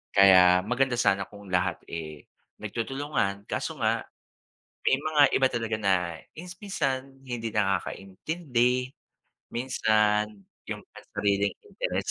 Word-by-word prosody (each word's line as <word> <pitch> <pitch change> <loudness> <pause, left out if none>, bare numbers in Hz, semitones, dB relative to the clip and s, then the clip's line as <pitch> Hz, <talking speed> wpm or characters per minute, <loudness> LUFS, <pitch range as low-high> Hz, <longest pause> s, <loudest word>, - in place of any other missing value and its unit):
Kaya 90 -2 +7
maganda 125 +2 +1
sana 100 -4 +3
kung 100 -1 -13
lahat 90 -1 +1
eh, 75 -3 -7 0.3
nagtutulungan. 115 -5 -2
Kaso - - -3
nga - - +1 0.8
may 130 - +3
mga 150 0 +2
iba 135 - +4
talaga 115 -3 -1
na 100 -3 +3 0.4
is 175 +2 -9
minsan 135 -9 -3
hindi 120 -4 -4
nakakaintindi, 120 - 0 0.6
minsan 105 -4 +1 0.2
yung - - -5
pansariling 100 0 -1
interest - - -3
115 Hz, 110 wpm, -27 LUFS, 100-135 Hz, 0.8 s, Kaya